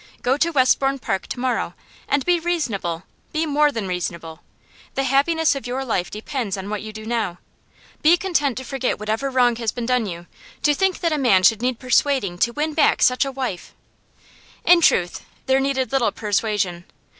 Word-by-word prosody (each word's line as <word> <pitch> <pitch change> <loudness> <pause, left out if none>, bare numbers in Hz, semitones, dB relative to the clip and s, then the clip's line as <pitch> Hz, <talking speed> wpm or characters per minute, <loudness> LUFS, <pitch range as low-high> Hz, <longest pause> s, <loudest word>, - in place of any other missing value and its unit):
Go 255 +2 +2
to 330 +4 +1
Westbourne 270 -2 +2
Park 195 -7 -3
to - - -5
morrow. 255 0 -1 0.3
And 285 -1 0
be 355 -1 +3
reasonable; 225 - -2 0.3
be 315 +1 0
more 295 0 +3
than 225 -7 -4
reasonable. 170 -2 -4 0.6
The 270 - 0
happiness 290 +5 +2
of 275 -3 -6
your 260 +2 -3
life 185 -7 -1
depends 215 -1 -4
on 195 +2 -6
what 210 - -3
you 215 - -7
do 215 0 -9
now. 220 -6 -2 0.6
Be 330 +3 +5
content 305 -9 0
to 260 - -4
forget 260 0 -2
whatever 220 +6 -2
wrong 245 -3 +2
has 230 -2 -1
been 240 -2 -5
done 250 -3 +1
you. 170 -2 -7 0.4
To 295 - +4
think 380 +5 0
that 335 -3 +1
a 300 - 0
man 200 -9 +4
should 220 +3 +4
need 250 -1 0
persuading 255 -7 +1
to 235 - +2
win 305 +3 -2
back 300 -1 +3
such 255 +2 +3
a 275 - -3
wife!' 255 -9 -5 0.9
In 350 -1 +6
truth, 180 - +2 0.2
there 265 0 +3
needed 270 -1 -1
little 245 -6 +2
persuasion. 205 -5 -1
255 Hz, 190 wpm, -22 LUFS, 210-280 Hz, 0.9 s, In